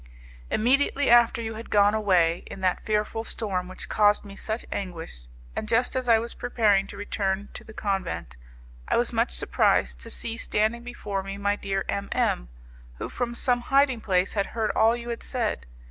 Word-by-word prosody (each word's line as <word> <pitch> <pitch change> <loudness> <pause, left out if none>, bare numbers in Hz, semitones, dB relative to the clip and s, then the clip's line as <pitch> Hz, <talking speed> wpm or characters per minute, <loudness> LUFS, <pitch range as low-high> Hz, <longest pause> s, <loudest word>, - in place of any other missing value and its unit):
"Immediately 275 +3 +2
after 235 -1 +5
you 225 0 -4
had 225 +1 -8
gone 205 0 +4
away 180 -6 +3
in 195 - -8
that 185 -1 +1
fearful 215 +1 -1
storm 195 -6 -3
which 185 - -7
caused 210 0 +3
me 200 -1 -10
such 220 +3 -3
anguish, 165 - -5 0.3
and 215 - -3
just 245 +3 +2
as 255 -1 -1
I 230 - +7
was 230 +1 +1
preparing 205 -5 +2
to - - -10
return 200 -1 -2
to - - -9
the - - -12
convent, 195 - -3 0.5
I - - +2
was - - 0
much - - +1
surprised - - +1
to - - -6
see 230 0 -3
standing 220 +2 0
before 210 -5 -4
me 195 +1 -6
my 200 0 +1
dear 195 -1 -2
M 200 0 -2
M, - - 0 0.5
who - - -5
from 240 -1 -3
some 245 0 +1
hiding 270 -1 +2
place 185 -2 +1
had 200 -2 0
heard 220 -1 +1
all 225 +1 +4
you 240 0 -7
had 235 - -4
said. 225 - -2
210 Hz, 190 wpm, -26 LUFS, 195-235 Hz, 0.5 s, I